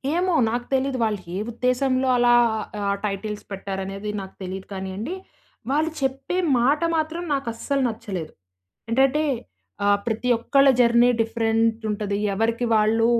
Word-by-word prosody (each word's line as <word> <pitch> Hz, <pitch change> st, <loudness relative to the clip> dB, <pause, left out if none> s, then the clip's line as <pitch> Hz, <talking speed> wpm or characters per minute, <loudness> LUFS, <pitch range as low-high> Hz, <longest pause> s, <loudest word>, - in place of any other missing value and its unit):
ఏమో 360 Hz, +1 st, +1 dB, 0.2 s
నాకు 240 Hz, +1 st, -2 dB
తెలిదు. 265 Hz, 0 st, +1 dB
వాళ్ళు 215 Hz, -2 st, 0 dB, 0.2 s
ఏ -, -, -2 dB
ఉద్దేశంలో 255 Hz, +2 st, +1 dB
అలా 240 Hz, 0 st, +5 dB, 0.6 s
ఆ -, -, +2 dB
టైటిల్స్ 210 Hz, +1 st, -4 dB
పెట్టారనేది 195 Hz, +1 st, -5 dB
నాకు 190 Hz, 0 st, -10 dB
తెలీదు 190 Hz, +1 st, -6 dB
కాని‌యండి. 195 Hz, -, -4 dB, 0.6 s
వాళ్ళు 310 Hz, +3 st, +1 dB
చెప్పే 270 Hz, +6 st, -1 dB, 0.2 s
మాట 280 Hz, +7 st, +2 dB, 0.2 s
మాత్రం 320 Hz, +2 st, -2 dB
నాకు 275 Hz, -3 st, -2 dB
అస్సలు 275 Hz, +4 st, -1 dB
నచ్చలేదు. 190 Hz, -7 st, -6 dB, 0.6 s
ఏంటంటే 270 Hz, +5 st, +3 dB, 0.6 s
ఆహ్, 205 Hz, 0 st, +4 dB
ప్రతి 230 Hz, +2 st, -1 dB
ఒక్కళ్ళ 275 Hz, +4 st, +4 dB
జర్నీ 235 Hz, 0 st, +5 dB
డిఫరెంట్ 225 Hz, 0 st, +1 dB
ఉంటది. 205 Hz, -1 st, -2 dB, 0.2 s
ఎవరికి 230 Hz, +4 st, 0 dB
వాళ్ళు 220 Hz, +1 st, +3 dB
230 Hz, 130 wpm, -23 LUFS, 205-270 Hz, 0.6 s, అలా